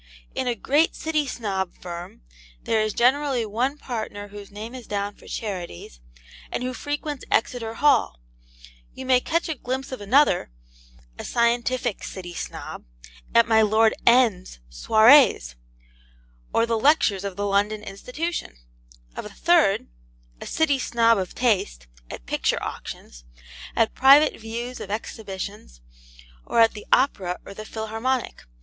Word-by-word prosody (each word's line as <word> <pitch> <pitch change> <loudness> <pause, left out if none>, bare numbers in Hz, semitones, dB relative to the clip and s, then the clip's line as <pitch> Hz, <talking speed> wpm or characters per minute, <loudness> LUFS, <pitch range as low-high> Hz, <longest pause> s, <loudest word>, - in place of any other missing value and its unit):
In 260 - -2
a 240 - 0
great 295 +8 +2
City 310 -2 -1
Snob 195 -7 -3
firm 175 - -8 0.4
there 220 -1 +1
is 215 0 0
generally 260 +1 +2
one 245 +7 -1
partner 220 -6 -6
whose 205 -1 -10
name 215 +4 -8
is 255 -2 -9
down 205 0 -2
for - - -18
charities, 175 - -6 0.5
and - - -3
who 255 0 -3
frequents 290 +1 -4
Exeter 225 -1 0
Hall; 255 - +2 0.8
you 260 - -7
may 255 -1 +4
catch 335 +6 -1
a 320 - -1
glimpse 265 0 -5
of 260 - -6
another 240 -1 +3 0.7
(a - - -5
scientific 235 -1 0
City 175 -2 -7
Snob) - - -7 0.5
at 235 0 +6
my 220 -1 +5
Lord 220 +1 +4
N 235 -7 +4
's - - -12
SOIREES, 220 - +5 1.0
or 230 - +2
the 230 -1 0
lectures 245 -8 +3
of 200 -2 -4
the 205 +1 -2
London 205 +1 0
Institution; 250 - -5 0.6
of - - -5
a - - -7
third - - +2 0.5
(a - - -7
City 290 -4 +1
Snob 230 -3 +3
of 185 -2 -5
taste) 190 - 0 0.2
at - - -9
picture - - 0
auctions, - - -8 0.5
at 225 - +2
private 275 +3 +6
views 235 +3 -6
of - - -7
exhibitions, 200 - -6 0.6
or - - -1
at 225 -1 +6
the 210 - -10
Opera 195 -9 +2
or 200 - -9
the 215 +2 -9
Philharmonic. 225 - -3
225 Hz, 145 wpm, -24 LUFS, 200-255 Hz, 1.0 s, at